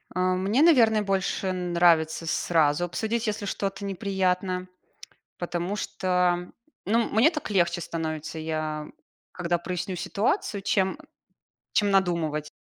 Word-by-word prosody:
Э, 185 - -1 0.2
мне, 200 +9 +1
наверно, 230 -10 +5
больше 195 -1 -1
нравится 170 -3 +2
сразу 165 -1 +2
обсудить, 225 +6 -2
если 210 0 -2
что-то 200 0 -3
неприятно, 185 -1 -1 0.7
потому 175 +2 -3
что, 180 -3 0 0.3
ну, 225 +4 +2
мне 235 +10 +5
так 300 -9 -5
легче 175 -3 +2
становится, 160 -1 -4
я 155 -1 -3 0.5
когда 175 -1 -1
проясню 180 +1 -4
ситуацию, 200 - -1
чем, 190 +6 +1 0.7
чем 205 -2 +2
надумывать. 170 -6 +1
185 Hz, 115 wpm, -26 LUFS, 170-200 Hz, 0.7 s, наверно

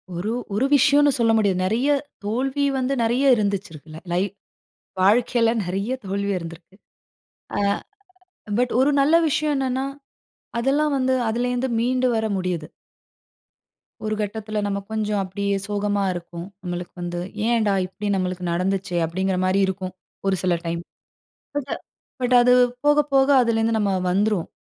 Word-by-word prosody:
ஒரு 190 +6 -2 0.2
ஒரு 245 - +2
விஷயம்னு 290 +1 +5
சொல்ல 230 -1 +4
முடியாது. 200 -4 +2
நிறைய, 230 +8 +1 0.4
தோல்வி 265 +6 0
வந்து 260 +1 0
நிறைய 255 +4 +4
இருந்திருக்கு 175 -7 -3
லை. 180 +2 +2 0.8
வாழ்க்கையில 230 +3 +3
நிறைய 195 +7 -2
தோல்வி 200 +1 -1
இருந்திருக்கு. 170 +2 -10 0.8
ஆ - - +1 1.0
பட் 250 0 +1
ஒரு 275 +3 +4
நல்ல 290 +4 +4
விஷயம் 300 +1 +1
என்னன்னா, 265 0 -1 0.7
அதெல்லாம் 285 +4 +1
வந்து 260 0 +1 0.2
அதிலருந்து 245 +3 -1
மீண்டு 255 +2 +1
வர 220 0 0
முடியிது. 180 -4 -2 1.4
ஒரு 215 0 -1
கட்டத்தில 215 0 -3
நாம 200 0 -1
கொஞ்சம் 210 -2 -1
அப்டியே 200 +1 -2
சோகமா 205 -1 0
இருக்கும், 170 0 -7 0.2
நம்மளுக்கு 175 0 -5
வந்து. 175 0 -3 0.3
ஏன்டா, 225 -4 +2
இப்டி 205 +3 -6
நம்மளுக்கு 185 -1 -2
நடந்துச்சே! 185 +1 -1
அப்டிங்கிற 185 +3 -1
மாரி 190 +1 +2
இருக்கும். 190 -1 -4 0.3
ஒரு 195 - +3
சில 180 -1 +2
டைம். 170 0 -2 0.7
பட், 285 -1 -3 0.5
பட் 250 0 +3
அது 250 +1 +5 0.3
போக, 295 0 +5 0.2
போக 270 0 +4
அதுலேருந்து 225 -1 +1
நம்ம 200 -2 +1 0.2
வந்துருவோம். 200 -1 +1
210 Hz, 130 wpm, -23 LUFS, 185-250 Hz, 1.4 s, விஷயம்னு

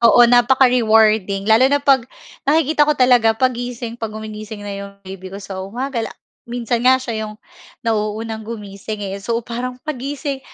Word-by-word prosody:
Oo, 240 +1 +7
napaka-rewarding 225 -5 +4
lalo 225 +5 +5
na 285 - +3
'pag, 270 -3 +2 0.4
nakikita 300 -1 +3
ko 300 - +2
talaga, 245 -3 +4
'pag 255 +1 +2
gising, 240 -1 -6
'pag 225 - -2
gumigising 215 -1 -7
na 205 - -5
'yong 200 0 -7
baby 190 0 -8
ko 195 - -8
sa 195 -1 -7
umaga, 240 +6 -3
la 225 - -4 0.4
minsan 240 -1 -1
nga 255 +2 +5
siya 230 -4 -4
'yong 210 - -9 0.5
nauunang 220 0 -2
gumising, 210 -1 -7
eh. 195 0 -5
So, 230 +3 -2
parang 245 +2 -4
paggising, 280 0 -4
230 Hz, 165 wpm, -19 LUFS, 215-255 Hz, 0.5 s, Oo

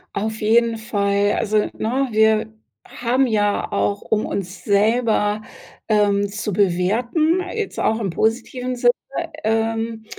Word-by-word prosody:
Auf 220 +2 -3
jeden 230 +1 +3
Fall, 205 -2 0
also, 215 -2 0 0.2
ne, 260 +5 -1
wir 220 0 +2 0.3
haben 250 +3 0
ja 205 -3 0
auch, 100 0 0
um 215 -1 0
uns 185 -1 -5
selber, 215 0 +2 0.5
ähm, 205 -2 +2
zu 210 +1 -4
bewerten, 220 - +1
jetzt 435 -3 -3
auch 220 - +1
im 205 -5 -2
positiven 250 +5 -1
Sinne, 245 0 +4 0.5
ähm 225 0 -1
220 Hz, 125 wpm, -21 LUFS, 205-235 Hz, 0.5 s, Sinne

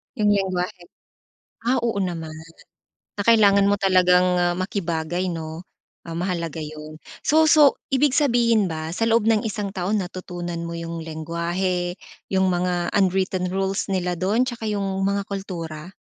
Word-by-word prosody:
Yung 210 -3 +2
lengguwahe? 185 -2 -1 0.8
Ah, 250 +2 +2
oo 230 -4 0
naman 165 -4 -4 0.8
na 205 - -4
kailangan 200 -3 +5
mo 205 - +3
talagang, 180 -2 +4
ah, 175 0 +2
makibagay, 175 -2 -2
'no? 160 0 -6 0.4
Ah, 165 - -9
mahalaga 170 -3 -3
yun. 155 0 -8 0.2
So, 315 +1 +4
so, 300 -3 +6
ibig 275 +1 +2
sabihin 235 -7 +3
ba 160 -1 -4
sa 225 +6 0
loob 230 -1 +3
ng 225 -1 +3
isang 205 -2 -3
taon 190 +2 -1
natutunan 175 -1 -6
mo 170 - -5
yung 170 0 -5
lengguwahe, 170 +3 -2 0.3
yung 190 -1 +2
mga 175 0 0
unwritten 190 -1 +1
rules 195 +2 -1
nila 180 -3 -1
dun 210 +7 +2
tsaka 240 -3 -4
yung 205 -1 -1 0.2
mga 200 0 0
kultura? 170 -5 -6
185 Hz, 145 wpm, -23 LUFS, 170-205 Hz, 0.8 s, so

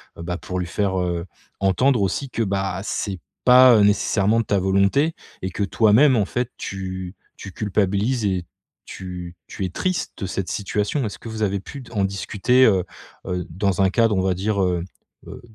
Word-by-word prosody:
Bah, 85 +1 -4
pour 90 0 -5
lui 90 - -3
faire, 95 +1 -1
heu, 85 -1 -2 0.3
entendre 110 +6 +2
aussi 115 +8 -1
que, 115 - -1
bah, 95 -2 -2
c'est 100 -3 -3 0.3
pas, 125 -1 +8
heu, 105 - +5
nécessairement 105 +1 +2
de - - -6
ta 100 -1 +1
volonté 100 - +2 0.3
et 95 - -2
que 100 - -3
toi-même, 110 +7 +4
en 105 -3 +2
fait, 120 +4 -3
tu 95 -1 -5 0.2
tu 95 - -9
culpabilises 105 +3 0
et 95 -3 -1 0.4
tu 90 -1 -8
tu - - -6
es - - -3
triste 185 - -2
de 100 - -3
cette 95 0 -3
situation. 105 +6 -1
Est-ce 105 - -5
que 115 - -8
vous 110 -1 -3
avez 100 -1 0
pu 140 +7 -9
d 125 - -14
en 100 -3 +1
discuter, 105 +6 +2
heu 95 -6 +3 0.4
heu, 90 0 -2
dans 95 +2 0
un 95 - +4
cadre, 115 +1 +2
on - - +2
va 95 0 +1
dire, 100 +2 -1
heu 90 -2 0 0.4
heu, - - -9
100 Hz, 195 wpm, -22 LUFS, 95-110 Hz, 0.4 s, pas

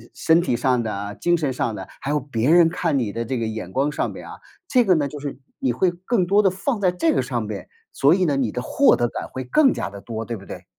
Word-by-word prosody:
身 165 +1 +3
体 125 -9 0
上 125 -2 +1
的、 105 -1 -4
精 175 0 +3
神 145 -5 -1
上 115 -3 -2
的， 95 -2 -7
还 135 - -4
有 150 - +1
别 130 -2 -1
人 170 0 +6
看 165 -3 -1
你 115 -6 -1
的 115 +2 -3
这 125 +2 -3
个 115 - -1
眼 110 -5 -5
光 140 +6 0
上 - - -2
边 - - -10
啊， - - -9 0.3
这 250 -2 +4
个 185 -4 +4
呢， 145 -2 +1
就 145 +1 -8
是 140 -2 -6 0.2
你 125 -3 0
会 180 +8 +2
更 185 +3 -1
多 200 +4 +4
地 190 - +5
放 215 +6 -2
在 185 -3 +2
这 315 - +1
个 - - +2
上 - - -3
边， - - -6 0.2
所 140 +3 +4
以 185 - +1
呢， 145 -4 +1
你 125 -6 0
的 125 - -3
获 280 - +4
得 120 - +1
感 - - -5
会 130 - -5
更 270 - +3
加 90 - -4
地 100 0 -10
多， 115 0 -5
对 115 0 -4
不 100 - -13
对？ - - -9
140 Hz, 300 characters per minute, -22 LUFS, 115-175 Hz, 0.3 s, 人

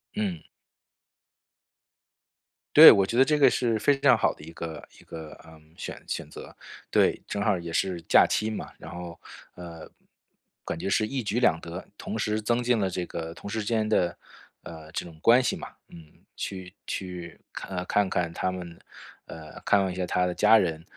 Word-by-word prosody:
嗯。 95 -7 -2 2.3
对， - - +12
我 100 - +4
觉 110 - -4
得 - - +8
这 150 +2 +1
个 135 -3 +6
是 115 -3 0
非 140 +5 +2
常 135 -4 +5
好 - - +1
的 - - -15
一 80 - -10
个 80 -1 -7
一 - - -17
个， 80 -2 -9
呃， 80 -1 -16 0.2
选 - - -7
选 - - -4
择。 - - -11 0.3
对， - - +2
正 100 - -3
好 105 -2 +2
也 85 -1 -7
是 90 +1 -1
假 - - +7
期 110 - 0
嘛， 110 - -6
然 - - -10
后， 85 0 -8 0.3
呃， 85 -2 -10 0.8
感 - - -4
觉 95 - -3
是 110 - +2
一 130 +4 -3
举 110 +1 -1
两 85 -10 +3
得。 85 +2 -8
同 110 - -5
时 110 0 -1
增 120 +3 0
进 120 -1 +2
了 95 -2 0
这 90 0 -3
个 80 -1 -6
同 - - -10
事 110 +2 -3
之 105 - -4
间 110 -1 0
的， 90 -6 +1 0.5
呃， 80 -1 -11
这 90 - -4
种 80 -2 -13
关 120 +6 +6
系 - - 0
嘛， - - -8 0.2
嗯， 80 -2 -16
去 95 -2 -6
去 90 -3 -6
看 - - -7
呃， 90 - -3
看 100 +1 +1
看 85 -2 -1
他 95 - -1
们 85 -2 -8 0.5
呃， 80 -1 -11
看 100 - +3
望 95 -1 -1
一 - - -6
下 95 - -2
他 90 +1 +1
的 90 - -1
家 105 +4 +5
人， 80 -6 -1
95 Hz, 210 characters per minute, -26 LUFS, 85-110 Hz, 2.3 s, 对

